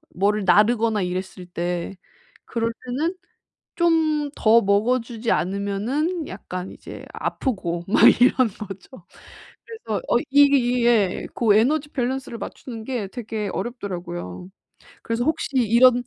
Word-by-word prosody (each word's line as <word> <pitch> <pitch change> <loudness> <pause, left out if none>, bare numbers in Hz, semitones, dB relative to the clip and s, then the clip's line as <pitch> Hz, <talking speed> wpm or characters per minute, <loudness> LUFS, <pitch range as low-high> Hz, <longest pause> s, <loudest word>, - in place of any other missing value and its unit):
뭐를 205 +2 +1
나르거나 220 +1 +3
이랬을 185 0 -5
때 175 +2 -3 0.5
그럴 230 -1 -1
때는 305 +9 -2 0.6
좀 325 -2 +3 0.2
더 230 +1 +5
먹어 205 +6 +2
주지 230 0 -4
않으면은 215 - -1
약간 185 -1 -7
이제 - - -10
아프고 175 - -3
막 200 - +3 0.2
이런 255 0 +5
거죠. 195 +4 -10 0.6
그래서 440 - -5
어 - - +4
이게 285 0 +6
이 245 -1 +1
예. 215 -6 +2
고 220 -4 +3
에너지 290 +6 +2
밸런스를 260 -2 -3
맞추는 230 -4 -7
게 240 -6 -3
되게 215 -2 -5
어렵더라고요. 180 - -5 0.6
그래서 230 +1 -1
혹시 320 +1 -1
이런 245 +1 +5
230 Hz, 265 characters per minute, -23 LUFS, 195-255 Hz, 0.6 s, 이게